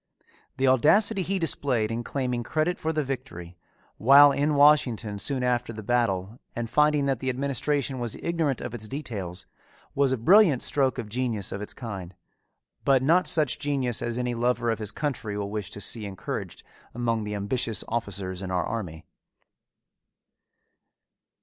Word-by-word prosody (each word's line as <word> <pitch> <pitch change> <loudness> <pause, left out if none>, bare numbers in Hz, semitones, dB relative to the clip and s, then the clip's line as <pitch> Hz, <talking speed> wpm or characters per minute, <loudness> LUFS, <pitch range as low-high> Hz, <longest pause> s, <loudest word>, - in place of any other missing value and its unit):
The 135 - +2
audacity 195 - +4
he 195 +2 -1
displayed 130 - 0
in 115 +1 -3
claiming 125 -2 -2
credit 155 +8 -1
for 160 - -1
the 155 -1 -1
victory, 125 -11 -6 0.4
while 140 +4 +7
in 145 +2 +1
Washington 125 -8 +3
soon 130 +3 0
after 125 -1 0
the 110 -1 -8
battle 110 -2 -1 0.2
and 120 0 -3
finding 150 +3 +3
that 135 -3 0
the 130 - -2
administration 135 0 -1
was 120 -3 -3
ignorant 165 -6 -1
of 120 - -6
its 110 -3 -4
details, 105 - -5 0.5
was 140 -1 +2
a 130 - +1
brilliant 165 - +5
stroke 135 -2 +1
of 120 -4 -4
genius 115 -3 -2
of 100 - -5
its 105 - -7
kind 95 -7 -7 0.7
but 135 -2 +3
not 170 +6 +3
such 155 -6 +2
genius 135 -5 -1
as 120 0 -2
any 125 -1 -1
lover 120 0 0
of 115 - -3
his 105 -1 -2
country 115 -8 -3
will 100 -1 -4
wish 105 -3 -4
to - - -8
see 105 +1 -3
encouraged 95 -3 -6 0.3
among 115 -2 -1
the 105 0 -4
ambitious 105 +2 -1
officers 100 -5 -3
in 95 - -5
our 90 -1 0
army. 85 -9 -5
120 Hz, 160 wpm, -26 LUFS, 105-140 Hz, 0.7 s, while